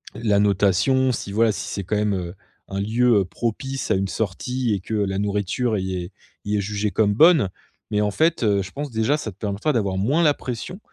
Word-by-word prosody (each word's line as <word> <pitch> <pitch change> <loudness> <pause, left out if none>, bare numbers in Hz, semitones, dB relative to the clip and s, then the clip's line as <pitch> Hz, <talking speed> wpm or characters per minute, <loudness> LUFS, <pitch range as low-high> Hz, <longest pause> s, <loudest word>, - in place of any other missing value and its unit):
la 105 -3 +1
notation. 105 +6 +3
Si 110 -4 -4
voilà, 115 +1 +3
si 100 - -5
c'est 100 - -4
quand 105 +4 -1
même, 105 -1 +1
heu, 90 -2 -4 0.4
un 95 - -3
lieu, 115 +2 +3
heu, - - -1
propice 120 +6 -3
à - - +4
une 95 +1 0
sortie 115 +4 -2
et 100 - -1
que 110 - -4
la 100 -2 0
nourriture 105 +3 0
y 95 -1 -3
est 90 +2 -8 0.3
y 105 +1 0
est - - +1
jugée 105 +1 -2
comme 105 -1 +2
bonne. 155 - +5 0.4
Mais 105 0 +1
en 105 - +1
fait, 160 +9 +1
heu, 100 -2 +2
je 95 - -10
pense 145 +1 -5
déjà 115 +6 +1
ça 110 -8 -5
te 90 - -21
permettra 105 +8 -1
d'avoir 100 -6 0
moins 135 - +2
la 150 -2 +5
pression. 125 - -6
105 Hz, 225 wpm, -23 LUFS, 100-125 Hz, 0.4 s, bonne